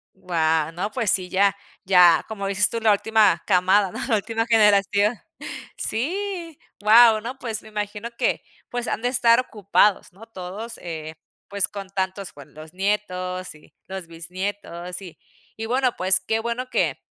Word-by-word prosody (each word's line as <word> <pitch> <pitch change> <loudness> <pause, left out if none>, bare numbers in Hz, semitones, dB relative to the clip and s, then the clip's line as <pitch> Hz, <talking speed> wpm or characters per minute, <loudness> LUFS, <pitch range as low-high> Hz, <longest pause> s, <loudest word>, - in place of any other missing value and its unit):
Guau, 160 -3 0
no 185 +5 -4
pues 230 -5 0
sí 185 -1 -1
ya 195 +1 +3 0.3
ya 180 -3 +6
como 200 -3 -4
dices 200 +1 +2
tú 230 - -3
la 220 -1 +4
última 210 -4 +3
camada, 190 +1 +3
¿no?, - - -7
la 235 - +2
última 225 +2 -2
generación. 210 -1 +3 0.6
Sí, 340 - -3 0.2
guau, 220 +1 +7
¿no?, 250 +4 -6
pues 225 -5 -4
me 220 - -13
imagino 210 +1 -4
que, - - 0 0.3
pues, 245 0 -4
han - - -2
de 245 - 0
estar 235 -2 +4
ocupados, 210 -4 +1
¿no?, 205 +5 -13
todos, 215 +3 -7
eh, 160 -2 -7 0.3
pues 200 -1 0
con 200 -2 -8
tantos 190 -2 -3
buen 145 -2 -14
los 155 +2 -12
nietos 185 -3 -2
y 150 - -20
los 190 -2 -7
bisnietos. 180 +1 -6
Y 180 -4 -11 0.4
y 225 - -4
bueno 255 +1 +1
pues 185 +1 +3
qué 220 +4 -1
bueno 235 +3 -3
que - - 0
200 Hz, 165 wpm, -23 LUFS, 185-225 Hz, 0.6 s, guau